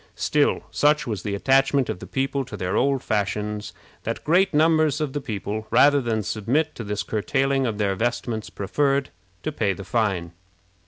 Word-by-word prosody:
Still, -, -, +1 dB
such 150 Hz, +1 st, +3 dB
was 105 Hz, -7 st, -3 dB
the 100 Hz, +1 st, -3 dB
attachment 135 Hz, +4 st, +3 dB
of -, -, -4 dB
the 90 Hz, -, -9 dB
people 135 Hz, +5 st, -1 dB
to 130 Hz, -, -8 dB
their 90 Hz, -1 st, -2 dB
old 135 Hz, 0 st, +1 dB
fashions, 105 Hz, 0 st, -2 dB, 0.3 s
that -, -, -4 dB
great 185 Hz, +5 st, +3 dB
numbers 155 Hz, -1 st, +3 dB
of 150 Hz, -3 st, -2 dB
the 145 Hz, -, -2 dB
people, 110 Hz, -2 st, -4 dB
rather 145 Hz, 0 st, +5 dB
than 110 Hz, -3 st, -1 dB
submit 125 Hz, +11 st, 0 dB
to 115 Hz, -, -7 dB
this 105 Hz, -1 st, -3 dB
curtailing 135 Hz, +4 st, 0 dB
of 110 Hz, -3 st, -3 dB
their 100 Hz, -2 st, +1 dB
vestments, 115 Hz, +1 st, -2 dB
preferred 135 Hz, +7 st, 0 dB, 0.3 s
to -, -, -2 dB
pay 110 Hz, -9 st, 0 dB
the 95 Hz, +1 st, -9 dB
fine. 95 Hz, -5 st, 0 dB
120 Hz, 175 wpm, -24 LUFS, 105-140 Hz, 0.3 s, rather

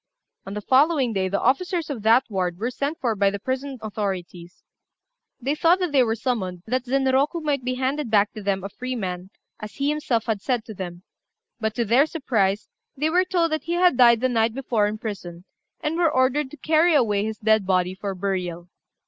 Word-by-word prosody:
On 195 Hz, -, -6 dB
the 210 Hz, -, -4 dB
following 265 Hz, 0 st, +3 dB
day, 190 Hz, -2 st, 0 dB
the 200 Hz, -, 0 dB
officers 330 Hz, +4 st, 0 dB
of 250 Hz, -6 st, -5 dB
that 225 Hz, +4 st, +5 dB
ward 180 Hz, -4 st, -2 dB
were 230 Hz, +6 st, -2 dB
sent 285 Hz, +6 st, -3 dB
for 240 Hz, -6 st, 0 dB
by 200 Hz, 0 st, +3 dB
the 200 Hz, -, -4 dB
prison 260 Hz, +5 st, -4 dB
authorities. 185 Hz, -5 st, -5 dB, 0.8 s
They 270 Hz, +3 st, -1 dB
thought 335 Hz, +3 st, +4 dB
that 360 Hz, -4 st, -2 dB
they 275 Hz, -2 st, +4 dB
were 225 Hz, -2 st, +1 dB
summoned 200 Hz, -7 st, -3 dB
that 255 Hz, +2 st, -1 dB
Zenroku 270 Hz, +4 st, +1 dB
might 290 Hz, -4 st, -1 dB
be 255 Hz, +1 st, -2 dB
handed 265 Hz, +1 st, -1 dB
back 210 Hz, -1 st, +3 dB
to 215 Hz, -, -7 dB
them 195 Hz, -1 st, -1 dB
a 195 Hz, -, -4 dB
free 255 Hz, +5 st, -5 dB
man, 185 Hz, -4 st, -4 dB, 0.3 s
as 210 Hz, 0 st, -8 dB
he 280 Hz, +1 st, 0 dB
himself 275 Hz, -7 st, -1 dB
had 220 Hz, -4 st, -1 dB
said 245 Hz, -2 st, -1 dB
to 220 Hz, -, -8 dB
them; 180 Hz, -2 st, -7 dB, 0.6 s
but 220 Hz, -1 st, -2 dB
to 235 Hz, -, 0 dB
their 250 Hz, +8 st, +4 dB
surprise, 220 Hz, -, 0 dB, 0.3 s
they 305 Hz, +3 st, 0 dB
were 365 Hz, +2 st, +3 dB
told 345 Hz, -3 st, +1 dB
that 310 Hz, -, -2 dB
he 340 Hz, -, -2 dB
had 355 Hz, -3 st, +4 dB
died 235 Hz, -2 st, +6 dB
the 255 Hz, -, +3 dB
night 225 Hz, -2 st, +1 dB
before 240 Hz, -6 st, 0 dB
in 210 Hz, +1 st, -3 dB
prison, 185 Hz, -5 st, -7 dB, 0.4 s
and 310 Hz, +2 st, -2 dB
were 340 Hz, -2 st, +3 dB
ordered 265 Hz, 0 st, +1 dB
to 300 Hz, -, -12 dB
carry 315 Hz, +3 st, +3 dB
away 210 Hz, -7 st, +2 dB
his 220 Hz, 0 st, -4 dB
dead 220 Hz, -2 st, +2 dB
body 185 Hz, -1 st, +1 dB
for 195 Hz, 0 st, -5 dB
burial. 180 Hz, -2 st, -3 dB
235 Hz, 210 wpm, -23 LUFS, 200-280 Hz, 0.8 s, died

